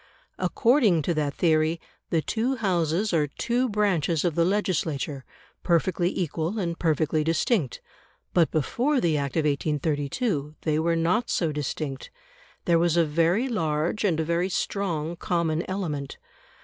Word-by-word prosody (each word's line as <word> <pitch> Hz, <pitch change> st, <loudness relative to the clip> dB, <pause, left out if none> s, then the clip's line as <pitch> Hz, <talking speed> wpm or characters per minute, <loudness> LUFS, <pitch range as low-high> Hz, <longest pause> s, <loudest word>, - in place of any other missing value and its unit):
According 230 Hz, -, +3 dB
to 170 Hz, -, 0 dB
that 150 Hz, -3 st, -1 dB
theory, 160 Hz, -1 st, +2 dB, 0.3 s
the 160 Hz, -2 st, +1 dB
two 240 Hz, +4 st, 0 dB
Houses 185 Hz, -, 0 dB
are 150 Hz, -3 st, +2 dB
two 245 Hz, -, -1 dB
branches 180 Hz, -7 st, +1 dB
of 170 Hz, -, +1 dB
the 170 Hz, -, +2 dB
legislature, 160 Hz, -7 st, -1 dB, 0.4 s
perfectly 175 Hz, +1 st, +1 dB
equal 170 Hz, +3 st, -2 dB
and 170 Hz, -4 st, -2 dB
perfectly 155 Hz, -1 st, +1 dB
distinct. 165 Hz, -, 0 dB, 0.5 s
But 170 Hz, -3 st, +4 dB
before 250 Hz, -, 0 dB
the 165 Hz, -8 st, +1 dB
Act 140 Hz, -2 st, -2 dB
of -, -, +4 dB
1832 150 Hz, -, -1 dB
they 155 Hz, -1 st, 0 dB
were 165 Hz, +1 st, +1 dB
not 170 Hz, +8 st, +1 dB
so 165 Hz, -3 st, +1 dB
distinct; 145 Hz, -1 st, -4 dB, 0.6 s
there 170 Hz, -1 st, +4 dB
was 170 Hz, 0 st, +2 dB
a 170 Hz, -, +4 dB
very 170 Hz, -, +2 dB
large 165 Hz, -, -1 dB
and 175 Hz, -6 st, +1 dB
a -, -, +1 dB
very 170 Hz, +3 st, 0 dB
strong 175 Hz, -4 st, -2 dB
common 170 Hz, -2 st, 0 dB
element. 155 Hz, -8 st, -3 dB
165 Hz, 145 wpm, -26 LUFS, 155-190 Hz, 0.6 s, But